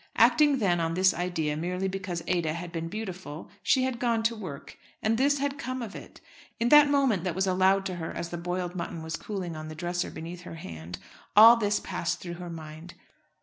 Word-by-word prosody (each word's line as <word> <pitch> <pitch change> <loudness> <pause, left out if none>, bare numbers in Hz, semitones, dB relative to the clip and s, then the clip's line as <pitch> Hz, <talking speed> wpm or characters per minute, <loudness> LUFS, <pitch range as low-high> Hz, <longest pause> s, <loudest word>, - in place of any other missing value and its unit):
Acting 295 -2 +5
then 185 -7 +2
on 165 0 -1
this 185 0 +4
idea 165 -4 -1
merely 180 +4 -2
because 185 -3 -4
Ada 170 -4 0
had 170 +1 -6
been 165 -1 -4
beautiful 185 -5 -7
she 260 +7 +3
had 260 -2 -2
gone 235 -2 +1
to 230 +1 +1
work, 175 -10 -8 0.3
and 220 +1 +2
this 280 +4 +3
had 280 0 -2
come 255 0 -4
of 210 -3 -7
it! - - -11 0.4
In 235 +1 +2
that 295 0 +8
minute 270 -10 +2
that 180 -3 -2
was 190 +1 +1
allowed 190 +1 +3
to 185 -2 -3
her 160 -1 -4
as 170 - -5
the 175 - -5
boiled 180 0 -3
mutton 170 -2 -5
was 160 0 -4
cooling 185 -5 -5
on 155 0 -7
the 155 - -7
dresser 175 +2 -2
beneath 170 +2 -8
her 175 - -9
hand, 85 - -8 0.4
all 225 +2 +11
this 210 -3 +1
passed 170 - -3
through 175 -1 -6
her 175 - -6
mind. 160 +1 -9
180 Hz, 215 wpm, -28 LUFS, 170-220 Hz, 0.4 s, all